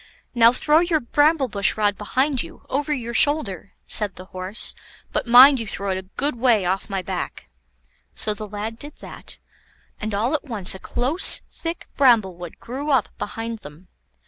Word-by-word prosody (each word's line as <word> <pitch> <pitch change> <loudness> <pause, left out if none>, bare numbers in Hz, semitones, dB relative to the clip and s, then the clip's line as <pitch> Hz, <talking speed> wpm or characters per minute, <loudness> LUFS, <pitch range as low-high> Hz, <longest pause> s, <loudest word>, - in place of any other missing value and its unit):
"Now 230 -1 +6
throw 300 +5 +4
your 340 -2 +1
bramble 290 +2 +2
bush 200 -3 0
rod 205 -1 +1
behind 260 +6 0
you, - - -11
over 290 +3 -2
your 235 -5 -3
shoulder," 235 - 0
said 205 -3 0
the 185 - -11
Horse; 185 +3 -1 0.4
"but 300 -5 -2
mind 255 +3 +8
you 225 - -5
throw 200 -1 -2
it 185 - -1
a 190 0 -13
good 285 -3 -1
way 230 -5 +2
off 190 +4 -2
my 195 -2 -3
back." 60 - -6 0.6
So 215 - 0
the 215 0 -8
lad 215 +3 -6
did 290 +1 -8
that, - - -9 0.6
and 215 -1 -4
all 230 +7 0
at 310 - -1
once 215 -9 0
a 190 - -9
close, 275 - +3
thick 335 0 -7
bramblewood 190 - +2
grew 275 +5 -6
up 265 -6 +2
behind 225 +2 -5
them. 155 +1 -14
230 Hz, 175 wpm, -22 LUFS, 200-275 Hz, 0.6 s, mind